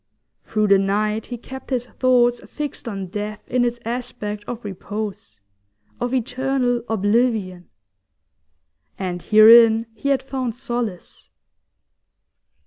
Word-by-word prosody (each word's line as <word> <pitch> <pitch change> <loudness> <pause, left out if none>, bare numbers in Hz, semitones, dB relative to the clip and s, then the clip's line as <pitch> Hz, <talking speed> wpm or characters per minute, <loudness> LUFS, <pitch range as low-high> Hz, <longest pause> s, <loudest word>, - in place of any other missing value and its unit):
Through 215 -1 0
the 200 -1 +6
night 210 +2 0
he 245 - -5
kept 265 +3 -10
his 250 -3 -1
thoughts 245 -1 +2
fixed 295 -5 -6
on 195 -4 -4
death 210 +2 -6
in 250 -1 +1
its 240 0 -1
aspect 225 -3 -4
of 240 -2 -6
repose, 205 - -6 0.6
of 245 0 -2
eternal 255 0 0
oblivion. 205 -4 0 1.3
And 180 -2 -4
herein 225 +2 +7
he 280 - -3
had 275 -1 +2
found 260 -3 -3
solace. 240 -7 -5
230 Hz, 115 wpm, -21 LUFS, 210-245 Hz, 1.3 s, herein